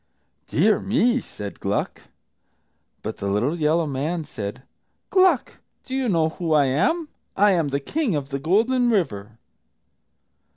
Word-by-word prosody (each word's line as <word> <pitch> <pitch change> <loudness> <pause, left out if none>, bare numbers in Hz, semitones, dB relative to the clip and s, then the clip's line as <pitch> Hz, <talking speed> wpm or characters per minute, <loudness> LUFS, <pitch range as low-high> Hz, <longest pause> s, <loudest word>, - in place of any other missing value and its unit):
"Dear, 205 +5 +3
me!" 245 +3 +2
said 100 - -8
Gluck. - - -2 1.0
But - - -5
the 100 - -4
little 120 +12 0
yellow 160 +2 +2
man 150 +4 -2
said, 105 -3 -6 0.5
"Gluck, 370 -8 +3 0.3
do 260 - -5
you 265 -3 0
know 165 -4 +2
who 165 0 -2
I 145 -2 +5
am? 265 - +1 0.3
I 205 +1 +5
am 170 -5 +1
the 140 0 -1
King 250 - -1
of 140 -2 -3
the 140 -1 -3
Golden 230 - +2
River." 115 - -1
165 Hz, 140 wpm, -23 LUFS, -, 1.0 s, I